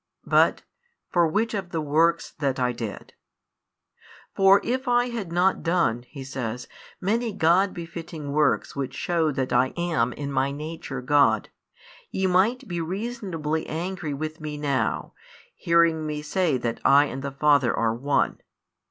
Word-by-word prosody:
but: - - +3 0.5
"For 175 -2 +4
which 215 +7 0
of 195 -4 -3
the 165 - -2
works 160 +3 +1
that 135 -3 0
I 125 -1 +1
did?" 115 -4 -7 1.2
For 195 +1 +6
|103 - - -14
if 260 +2 -2
I 245 0 +3
had 220 -8 -5
not 180 +2 +2
done, 165 -9 +1
He 140 -3 -8
says, 125 -2 -5 0.3
many 225 +5 0
God 190 +1 +3
befitting 165 -3 -7
works 150 0 +1
which 140 -2 -4
shew 165 -3 0
that 130 -2 -2
I 125 +2 +2
am 165 -9 0
in 140 -1 -5
My 135 0 +1
Nature 150 -2 -6
God, 125 -6 +3 0.6
ye 190 - -1
might 210 +8 +2
be 175 -2 -3
reasonably 180 -5 -3
angry 170 -2 -4
with 155 +2 -5
Me 150 -1 -5
now, 140 -3 -1 0.4
hearing 170 -2 +2
Me 150 0 -4
say 155 -2 +1
that 120 -2 -3
I 140 +1 +6
and 135 -2 -5
the 140 - -3
Father 140 -2 +3
are 115 -1 0
One. 140 +5 0
155 Hz, 155 wpm, -25 LUFS, 140-180 Hz, 1.2 s, For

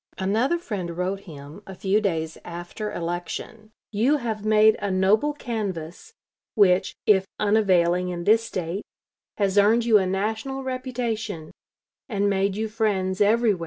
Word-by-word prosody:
Another 220 - +1
friend 185 - -5
wrote 185 +2 -1
him, 150 -2 -11
a 190 - -8
few 195 +3 +1
days 160 -5 -1
after 175 +5 -6
election: 175 +6 -5 0.2
"You 240 +8 +2
have 225 -5 -4
made 215 0 +5
a 205 - -1
noble 195 +9 +3
canvass, 215 - -5 0.4
which, 190 -3 +3
if 195 -2 +4
unavailing 180 -4 +2
in 175 -1 -4
this 220 +4 +4
State, 185 -3 -4 0.6
has 200 -1 +2
earned 225 +3 +4
you 220 -3 +6
a 190 - 0
national 220 +8 -2
reputation, 235 -9 -4 0.6
and 205 -3 0
made 195 0 +1
you 220 +1 -2
friends 205 -4 -1
everywhere." 215 -1 +3
205 Hz, 140 wpm, -24 LUFS, 185-220 Hz, 0.6 s, you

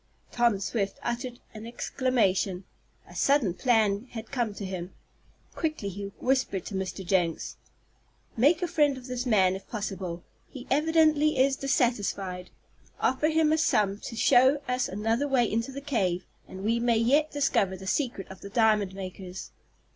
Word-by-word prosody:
Tom 235 -4 +2
Swift 200 0 -2
uttered 240 +1 -3
an 220 +1 -8
exclamation. 210 -7 0 0.4
A - - -14
sudden 275 -10 +2
plan 220 0 +1
had 225 -1 -7
come 240 -5 -1
to 200 - -6
him. 185 -1 -6 0.6
Quickly 310 -11 -2
he 200 +1 -6
whispered 255 -8 0
to - - -7
Mr. 190 0 -4
Jenks: 175 -3 0 0.8
"Make 300 +9 +3
a - - +1
friend 295 -5 +2
of 255 - -10
this 250 0 -4
man 190 -5 +4
if 195 - -10
possible. 190 -6 -4 0.3
He 260 -2 -9
evidently 305 0 +3
is 270 +1 +3
dissatisfied. 205 -9 -1 0.5
Offer 265 +4 +1
him 315 -1 +3
a 315 - +2
sum 205 -9 +2
to 230 - -7
show 260 +4 +5
us 250 0 0
another 225 +7 0
way 260 -4 +3
into 230 +4 -2
the 275 +1 -7
cave, 200 -11 -1 0.2
and 190 +1 -9
we 230 +3 +1
may 235 -1 +2
yet 280 +7 +3
discover 210 -10 +1
the 190 - -10
secret 235 -2 -1
of 190 - -12
the 200 - -8
diamond 210 -3 +2
makers." 185 -1 -7
230 Hz, 160 wpm, -27 LUFS, 195-270 Hz, 0.8 s, show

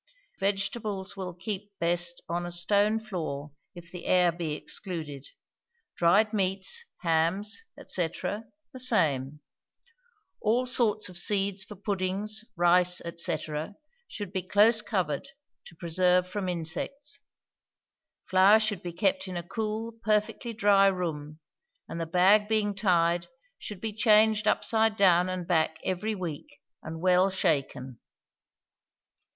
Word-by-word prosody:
Vegetables 200 0 -2
will 185 -3 -6
keep 200 +2 -6
best 175 0 0
on 175 +1 -2
a 175 - -5
stone 205 +5 +2
floor 160 -9 -5 0.2
if 170 -1 -12
the 180 - -8
air 180 -1 +4
be 165 -2 -4
excluded. 155 -7 -6 0.7
Dried 200 +6 +3
meats, 195 - -1 0.2
hams, 170 - 0 0.2
&c., 175 -3 +1
the 220 - -7
same. 150 - +1 1.0
All 235 +4 +2
sorts 220 -4 +1
of 180 -1 -7
seeds 195 -1 +1
for 210 - -11
puddings, 200 +2 -3
rice, 180 +1 +3 0.2
&c., 170 - 0 0.7
should 205 -3 -7
be 190 - -1
close 210 +5 +4
covered, 185 - -2 0.4
to 170 - -13
preserve 180 +1 +2
from 190 -1 -3
insects. 275 - -4 1.1
Flour 190 +3 +6
should 215 -4 -2
be 175 -1 -6
kept 190 +1 0
in 185 -1 -5
a 170 - -4
cool, 220 +2 -3
perfectly 215 +2 0
dry 205 -3 +4
room, 155 -5 -3 0.5
and 165 - -5
the 165 - -3
bag 190 +5 +4
being 215 -2 +1
tied 175 -3 +1 0.3
should 205 -3 -7
be 220 +1 -4
changed 215 0 +4
upside 220 0 +2
down 185 -3 +4
and 185 -1 -3
back 160 -2 +1
every 200 +4 -2
week, 170 -6 -7 0.2
and 160 +1 -7
well 185 +1 +4
shaken. 140 - -1
190 Hz, 125 wpm, -28 LUFS, 175-210 Hz, 1.1 s, Flour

